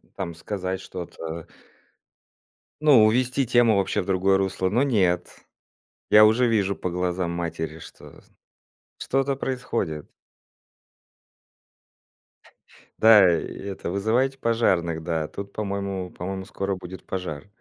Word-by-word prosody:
там, 85 -3 -4
сказать 95 +2 -4
что-то. 85 -2 -7 1.3
Ну 135 -8 +6
увести 125 +3 +1
тему 120 -2 +4
вообще 95 -1 0
в - - -10
другое 95 0 +2
русло, 95 -1 0
но 120 +7 +2
нет, 100 -10 0 0.7
я 105 0 +8
уже 115 +3 +4
вижу 100 -3 +1
по 90 - -4
глазам 90 0 -2
матери, 80 -2 -4
что - - -14 0.8
что-то 135 +1 0
происходит. 120 - -3 2.9
Да, 110 -4 +7
и - - -5
это 95 -3 -6
вызывайте 120 +8 0
пожарных, 90 -9 +1
да 80 -2 -2
тут, 100 0 -8
по-моему 100 -3 -4
по-моему, 95 +2 -5
скоро 100 0 -3
будет 95 0 -10
пожар. 90 -5 -5
95 Hz, 110 wpm, -24 LUFS, 90-110 Hz, 2.9 s, я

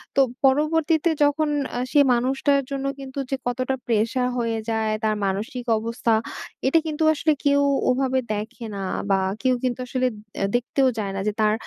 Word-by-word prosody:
তো - - +3 0.2
পরবর্তীতে 310 +4 +3
যখন 295 +1 +2 0.3
আ - - -1
সে 295 - +4
মানুষটার 270 +3 +2
জন্য 275 0 -3
কিন্তু 270 0 -7
যে 270 - 0
কতটা 255 +2 -1
প্রেশার 230 +3 +1
হয়ে 230 -2 -1
যায় 220 -1 0
তার 215 -1 +2
মানসিক 215 +6 -3
অবস্থা, 230 +1 -1 0.5
এটা 325 +5 +4
কিন্তু 310 +1 -1
আসলে 310 +1 +1
কেউ 285 0 +4 0.3
ওভাবে 260 0 +1
দেখে 225 +3 -5
না 195 - -4 0.3
বা 195 - +4 0.2
কেউ 255 -1 +3
কিন্তু 255 -1 -1
আসলে, 255 0 0 0.5
দেখতেও 260 +2 +1
যায় 200 -2 -2
না - - -2
যে 210 - +1
তার 215 0 +4
255 Hz, 165 wpm, -23 LUFS, 230-280 Hz, 0.5 s, সে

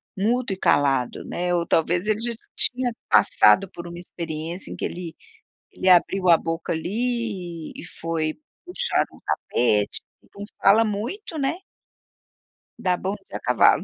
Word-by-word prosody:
mudo 225 +2 0
e - - -6
calado", 135 -8 +1
né. 175 0 -1
Ou 170 -1 0
talvez 170 +4 +1
ele 215 +1 0
já 235 -1 -1 0.2
tinha 250 -1 +3 0.2
passado 195 0 +5
por 170 0 -8
uma 170 - -8
experiência 170 0 -6
em - - -5
que - - -3
ele 170 -2 -6 0.6
ele 185 - -1
abriu 185 +1 +4
a 170 - +8
boca 165 0 -3
ali 195 -3 -3
e - - -8
e - - -10
foi 160 -1 -1 0.3
puxar 475 +7 0
um - - -17
tapete, 105 -4 +1 0.2
então 200 - -10 0.2
fala 215 +4 +6
muito, 245 - -4
né. 275 +3 0 1.2
Dá 180 -1 +1
bom 190 +3 -3
dia - - -5
a - - -11
cavalo. - - +4
185 Hz, 155 wpm, -24 LUFS, 165-225 Hz, 1.2 s, a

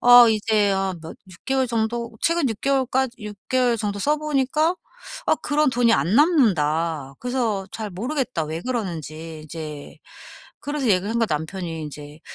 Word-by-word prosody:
어 245 -1 +9
이제 215 -2 +2
어 195 -1 0
뭐 160 0 -8 0.2
6 175 - -16
개월 265 -1 +1
정도 235 +1 -1
최근 335 -4 +2
6 220 -2 -5
개월까지 265 -2 +1
6 210 -1 -7
개월 250 -2 +2
정도 205 -2 -2
써 295 +9 +2
보니까 305 +2 +1 0.5
"아 - - +4
그런 295 -1 +1
돈이 245 -2 +3
안 190 -3 +2
남는다. 165 - +2
그래서 235 -6 -1
잘 220 -2 -4
모르겠다 245 - -2
왜 160 +2 -4
그러는지." 165 - -5
이제 155 -2 -8 0.6
그래서 290 -1 -3
얘기를 195 -1 +2
하니까 230 0 +1
남편이 160 +1 -3
인제 150 0 -9
220 Hz, 295 characters per minute, -23 LUFS, 165-260 Hz, 0.6 s, 어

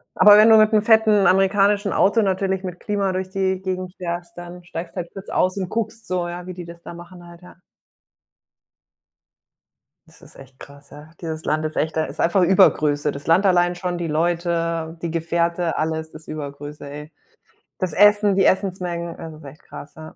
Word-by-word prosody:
Aber 210 0 +7
wenn 215 +1 +7
du 220 - +8
mit 215 0 +5
'nem 210 - +4
fetten 220 -2 +4
amerikanischen 200 +1 +2
Auto 220 +3 +3
natürlich 190 -1 -1
mit 180 -1 -6
Klima 200 -2 -1
durch 185 0 -3
die 190 -1 -1
Gegend 185 -1 -4
fährst, 175 -1 -6
dann 175 0 -10
steigst 170 0 -8
halt 175 -2 -5
kurz 195 - -10
aus 185 +2 0
und 185 -2 -3
guckst 225 0 -4
so, 180 -1 -2
ja, 175 +1 -7
wie 185 - -6
die 175 -1 -9
das 170 0 -12
da - - -10
machen 175 +1 -13
halt, 170 0 -15
ja. 180 - -16 2.5
Das - - -21
ist - - -17
echt 135 -1 -15
krass, 140 0 -14
ja. 150 +2 -14
Dieses 160 -2 -6
Land 155 +1 -1
ist 155 - -5
echt 160 +1 -2
da 155 - +1
ist 140 +3 -6
einfach 175 +3 +2
Übergröße. 150 -6 +3
Das 140 +2 -10
Land 180 +5 +3
allein 175 -1 +3
schon, 180 0 -4
die 170 -1 -3
Leute, 165 0 -1
die 170 -2 -3
Gefährte, 170 +1 -1
alles 160 0 -3
ist 155 +1 -13
Übergröße, 145 -1 -8
ey. 150 +2 -9 0.7
Das 185 -6 -3
Essen, 205 -1 +4
die 195 - +3
Essensmengen, 180 -3 -1
es 160 -1 -9
ist 155 -1 -14
echt 140 +2 -13
krass, 145 - -11
ja. 160 0 -11
175 Hz, 195 wpm, -21 LUFS, 160-190 Hz, 2.5 s, du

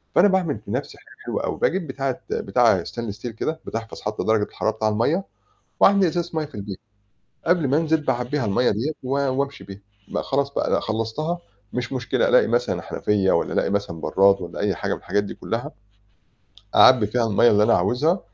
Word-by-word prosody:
فأنا 200 - +6
باعمل 185 -7 +1
في - - -7
نَفْسي - - -4
حاجة - - -18
حلوة - - -2
أوي، - - -3
باجيب 180 -3 0
بتاعة 135 -1 -3
بتاعة - - +2
stainless 115 -4 -5
steel 120 - -4
كده 155 +8 -3
بتحفظ 115 -1 -6
حتى 105 0 -3
درجة 110 -1 +2
الحرارة 110 - -2
بتاع 110 0 0
المَيّة، 145 - +1 0.6
واعبّي 200 -2 +5
إزازة 175 +1 -2
مَيّة 155 -1 -1
في 140 - -13
البيت، 100 -2 -6 0.7
قبل 170 -5 +2
ما 140 +3 +2
أنزل 160 -1 +1
باعبّيها 130 -1 -1
المَيّة 105 +5 +2
ديّة 115 +10 -1
و 130 - -6
وأمشي 140 0 -1
بيها، 100 0 -10 0.3
بق - - -2
خلاص 140 0 -1
بقى، - - -1
لأ - - +3
خلّصتها؟ 115 +11 -2 0.3
مش 125 +1 -3
مشكلة، 130 - 0
ألاقي - - +5
مثلًا - - 0
حنفيّة، 100 -2 0
والّا 85 - +1
ألاقي - - +1
مثلًا 100 -5 -2
برّاد، 100 +4 +3
والّا 85 - -7
أي 100 -3 0
حاجة - - -2
من - - -6
الحاجات 100 +3 -1
دي 100 - -6
كلّها، 115 +2 -4 1.0
أعبي 125 -5 +7
فيها 115 +2 0
المَيّة 110 +3 +4
اللي 105 0 +4
أنا 115 +2 +4
عاوزها، 145 - +1
125 Hz, 195 wpm, -23 LUFS, 105-155 Hz, 1.0 s, أعبي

